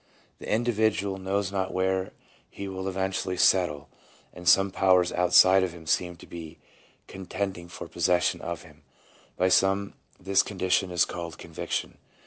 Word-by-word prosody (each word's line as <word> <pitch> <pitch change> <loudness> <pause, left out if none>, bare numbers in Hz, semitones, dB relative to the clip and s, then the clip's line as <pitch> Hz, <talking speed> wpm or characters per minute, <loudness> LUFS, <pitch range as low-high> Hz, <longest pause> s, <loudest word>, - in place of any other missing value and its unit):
The - - -6
individual 110 -4 0
knows 95 0 -2
not 95 -1 -2
where 95 0 0 0.4
he 100 - -7
will 95 0 -5
eventually 95 -1 -2
settle, 90 -6 +2 0.5
and 90 0 0
some 95 +1 +5
powers 90 -2 +3
outside 95 +2 +5
of 90 -2 -2
him 85 -2 -12
seem 90 +2 0
to - - -14
be 85 -1 -9 0.5
contending 95 -1 -5
for - - -9
possession 90 -1 +1
of - - -5
him. - - -18 0.6
By 95 - +2
some 95 +2 +2 0.3
this 95 +1 +3
condition 95 -1 0
is 90 -1 +2
called 85 -2 -7
conviction. - - -5
95 Hz, 145 wpm, -27 LUFS, 90-95 Hz, 0.6 s, some